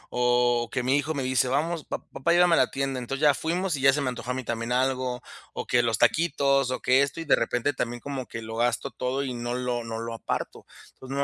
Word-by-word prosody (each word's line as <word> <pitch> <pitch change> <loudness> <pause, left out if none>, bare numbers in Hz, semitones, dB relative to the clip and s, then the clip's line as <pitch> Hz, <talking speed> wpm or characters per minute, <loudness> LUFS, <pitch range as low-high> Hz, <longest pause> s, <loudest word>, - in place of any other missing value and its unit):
o 120 -1 +2
que 125 - -1
mi 130 +2 +2
hijo 155 +2 -1
me 140 -3 -2
dice: 130 0 +2
"Vamos, 155 +4 -1
pa - - -4
papá, 155 +5 0
llévame 175 -1 +5
a - - +2
la 130 - +3
tienda". 135 -1 -2
Entonces, 135 +3 -5
ya 145 -1 +6
fuimos, 175 +4 -1
y - - -5
ya 135 0 +6
se 145 - 0
me 135 - 0
antojó 125 0 -5
a - - 0
mí 130 0 -4
también 115 +1 -3
algo. 130 -1 0 0.3
O - - -5
que 125 - +3
los 115 -3 +1
taquitos, 140 -4 +2
o 125 - -3
que 130 +2 +4
esto. 140 +4 -4
Y - - -6
de 150 - +5
repente, 125 +4 0
también, 120 -2 -3
como 135 -1 -5
que 115 - -7
lo 110 0 -7
gasto 120 0 0
todo, 130 +2 -2
y 130 -2 -3
no 120 0 -4
lo 125 -1 -2
no 115 -1 -5
lo 115 0 -5
aparto. 115 - -4 0.3
Entonces, 130 - -12
no 140 - +2
130 Hz, 260 wpm, -26 LUFS, 120-140 Hz, 0.3 s, ya